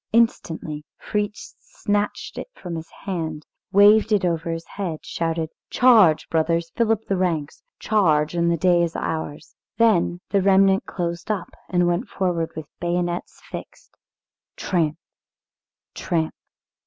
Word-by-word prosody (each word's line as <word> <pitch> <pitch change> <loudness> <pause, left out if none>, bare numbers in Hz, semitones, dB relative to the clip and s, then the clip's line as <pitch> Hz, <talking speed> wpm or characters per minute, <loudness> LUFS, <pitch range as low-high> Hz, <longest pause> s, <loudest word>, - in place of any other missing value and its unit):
Instantly, 160 -9 +1
Fritz 210 0 -4
snatched 205 0 -2
it - - -6
from 175 -2 -7
his 160 0 -7 0.2
hand, 160 -5 -3 0.3
waved 205 +2 +6
it 205 -3 +3
over 165 -1 -1
his 165 0 -3
head, 180 -6 -5
shouted, 165 -1 -2 0.2
"Charge, 215 -11 +5
brothers, 165 +1 0
fill 230 -2 +2
up 220 0 0
the 195 - 0
ranks! 165 -5 -1 0.2
Charge, 160 -8 +2
and 170 0 +1
the 170 - +2
day 175 +1 +4
is 170 -1 -1
ours!" 160 -2 -4 0.2
Then 190 -6 +3
the 200 - +3
remnant 195 0 +4
closed 170 0 -4
up 205 -5 -2 0.2
and 175 -1 +2
went 175 +7 0
forward 175 -4 -1
with 160 -1 -6
bayonets 175 0 -2
fixed, - - -9 0.6
tramp, 160 -4 0 1.0
tramp. 160 -3 -1
175 Hz, 135 wpm, -23 LUFS, 165-200 Hz, 1.0 s, waved